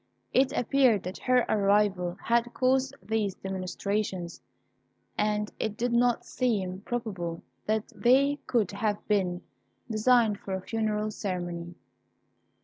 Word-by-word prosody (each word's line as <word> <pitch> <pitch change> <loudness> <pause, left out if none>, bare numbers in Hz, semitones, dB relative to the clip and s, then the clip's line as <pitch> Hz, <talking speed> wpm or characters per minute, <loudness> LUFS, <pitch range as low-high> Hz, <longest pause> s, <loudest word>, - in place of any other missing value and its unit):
It 260 +1 +4
appeared 245 -5 +3
that 180 +1 -6
her 250 -1 +3
arrival 200 -3 +2
had 235 0 +2
caused 265 +1 +2
these 215 -3 -1
demonstrations, 190 -1 -3 0.7
and 210 0 0
it 210 -1 -2
did 240 0 0
not 240 0 +2
seem 195 -7 -1
probable 190 -8 -4 0.2
that 215 0 -1
they 275 +4 +4
could 225 -6 +1
have 205 0 -2
been 185 -4 +1 0.5
designed 220 -1 +3
for 190 - -4
a 190 - -4
funeral 215 0 -1
ceremony. 175 -4 -4
210 Hz, 120 wpm, -28 LUFS, 190-240 Hz, 0.7 s, It